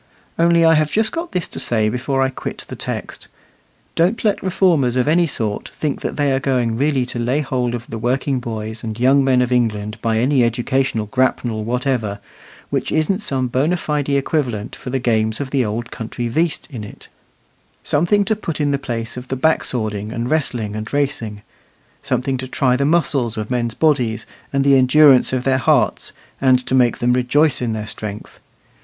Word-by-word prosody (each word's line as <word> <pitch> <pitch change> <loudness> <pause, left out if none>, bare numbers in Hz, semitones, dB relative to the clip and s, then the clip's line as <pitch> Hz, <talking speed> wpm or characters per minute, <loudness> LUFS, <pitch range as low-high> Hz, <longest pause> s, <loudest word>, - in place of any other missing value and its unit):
Only 170 0 +4
I 165 - +6
have 155 -1 +2
just 220 +4 +1
got 335 +1 -4
this 180 -2 -2
to - - -6
say 110 -2 +1
before 135 +4 0
I 130 - +1
quit 130 - -6
the - - -7
text. - - -6 0.7
Don't 185 +8 +1
let 210 - +2
reformers 170 -9 +2
of 125 +1 +1
any 170 +2 +3
sort 110 -7 -2
think 150 -3 -3
that - - -4
they 145 -2 +2
are 135 - +1
going 125 -4 0
really 135 0 +1
to 120 -1 -5
lay 125 +5 0
hold 125 -3 -1
of 120 0 -6
the 115 - -6
working 130 +3 0
boys 110 -2 -6
and 110 0 -5
young 135 +3 +4
men 130 -2 +3
of 125 - -3
England 105 -3 0
by 115 -1 0
any 130 +2 +3
educational 120 0 0
grapnel 120 -2 0
whatever, 120 -3 -1 0.5
which - - -1
isn't 155 +5 +1
some 135 -11 -1
bona 145 +9 +1
fide 150 -3 -2
equivalent 135 -6 -1
for - - -8
the 135 - 0
games 110 -3 0
of 140 -2 -4
the 135 -2 +2
old 115 +2 -4
country 120 0 -4
"veast" 160 +7 -1
in 120 -5 -6
it; 105 - -11 0.8
something 175 +7 +2
to 220 - +1
put 165 -7 -5
in 145 -1 +1
the 140 - 0
place 120 -3 -5
of 125 +1 -7
the 130 - -2
back 160 +5 +2
swording 110 -3 -2
and 120 +2 -3
wrestling 120 -9 -1
and 110 0 -5
racing; 135 -8 -2 0.6
something 130 +1 -1
to 130 +1 -5
try 130 -1 +1
the 140 +2 0
muscles 140 -8 +1
of 110 +2 -4
men's 120 -2 -1
bodies, 125 -8 +1 0.3
and 140 -1 +1
the 140 0 +5
endurance 135 +1 +5
of 130 -1 -1
their 130 0 +2
hearts, - - +1 0.3
and 130 -1 +5
to - - -3
make 125 -3 +3
them 120 +1 +1
rejoice 130 +4 +2
in 120 -2 -1
their 110 -1 -4
strength. 105 -1 -7
130 Hz, 195 wpm, -19 LUFS, 115-145 Hz, 0.8 s, I